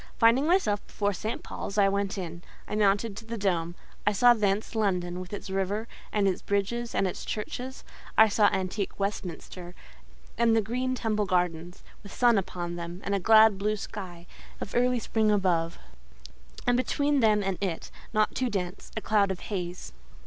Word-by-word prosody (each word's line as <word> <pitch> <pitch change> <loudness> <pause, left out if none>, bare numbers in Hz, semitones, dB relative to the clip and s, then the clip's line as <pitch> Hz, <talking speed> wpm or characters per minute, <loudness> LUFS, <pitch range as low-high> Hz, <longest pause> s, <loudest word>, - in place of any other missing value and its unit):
Finding 240 +5 +4
myself 330 - +2
before 205 -1 -1
St. 215 +4 -4
Paul's, 200 - -6
I 200 -1 +5
went 200 +1 -1
in; 170 -2 -5 0.3
I - - -6
mounted 205 0 +2
to 225 - -8
the 230 0 -4
dome: 175 -4 0 0.3
I 205 - +2
saw 245 +4 +6
thence 210 -1 0
London, 180 -5 0
with 185 0 -8
its 205 -1 -6
river, 195 +4 -1 0.2
and 205 -2 +2
its 185 - 0
bridges, 220 +4 -1
and - - +2
its 185 - -3
churches; 250 +5 -5 0.3
I 220 - +8
saw 205 0 +4
antique 190 +2 -2
Westminster, 180 -2 -5 0.6
and 230 -1 +4
the - - +5
green 250 +4 -1
Temple 215 -4 -1
Gardens, 175 -1 -1 0.2
with 200 - -12
sun 240 -4 +4
upon 175 -2 -5
them, 170 +2 -6
and 200 - -2
a 200 - +2
glad, 220 0 +6
blue 210 +1 +1
sky, 185 -4 -7 0.3
of - - -6
early 250 +1 +3
spring 220 -2 +1
above; 180 -5 +1 0.9
and 245 - +3
between 285 +3 +1
them 215 -3 +4
and 195 -2 -2
it, 180 -5 -3 0.2
not 215 -1 +2
too 255 -1 0
dense, 185 -3 -4
a - - -1
cloud 210 -2 +2
of 190 -2 -3
haze. 180 -3 -5
205 Hz, 180 wpm, -28 LUFS, 185-220 Hz, 0.9 s, I